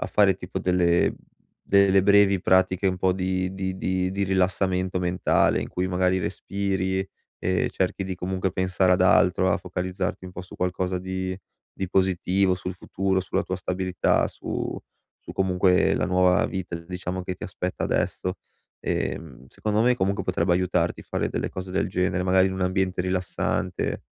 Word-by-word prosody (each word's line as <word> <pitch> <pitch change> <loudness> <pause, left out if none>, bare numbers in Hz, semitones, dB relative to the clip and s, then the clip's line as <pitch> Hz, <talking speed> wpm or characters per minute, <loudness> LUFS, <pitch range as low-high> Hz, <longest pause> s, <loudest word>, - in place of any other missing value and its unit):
a - - -2
fare 100 -2 +4
tipo 90 0 -6
delle 90 -1 +2
mhmm, - - -11 0.5
delle 100 -1 +5
brevi 100 -1 +5
pratiche 95 +1 +3
un 95 -1 +1
po' 95 0 +2
di 95 0 -1
di 95 -1 -3
di 95 0 -1
di 100 +1 -1
rilassamento 95 0 0
mentale, 90 0 +2
in - - -4
cui, 90 +1 -2
magari, 90 0 +1
respiri 95 +1 -2 0.3
e 90 0 0
cerchi 95 +1 -1
di, 95 0 -3
comunque, 95 +1 -2
pensare 95 0 +2
ad 90 - +2
altro, 95 0 +4
a - - +3
focalizzarti 90 +1 -4
un 90 - -8
po' 90 - -7
su 90 - -13
qualcosa 90 0 -1
di 95 0 -3 0.4
di 95 - -4
positivo, 95 0 +2
sul 90 +1 -5
futuro, 95 +1 -1
sulla 95 +1 -1
tua 95 - -3
stabilità, 90 -1 0
su - - -4 0.4
su, - - -10
comunque, 90 0 +3
la - - 0
nuova 90 +2 +3
vita, 95 -2 -4
diciamo, 90 +2 -5
che 90 0 -4
ti - - -8
aspetta 90 0 -3
adesso. 90 +1 -1 0.5
Ehm, 65 -6 -3
secondo 105 +7 -1
me, 125 +1 +4
comunque, 100 -3 0
potrebbe 90 -1 +1
aiutarti 90 -1 0
fare - - -2
delle - - -3
cose 95 0 -6
del - - 0
genere, 90 0 0
magari 95 0 +4
in 95 - -2
un 95 - -2
ambiente 95 0 0
rilassante. 90 0 -2
95 Hz, 170 wpm, -25 LUFS, 90-95 Hz, 0.5 s, delle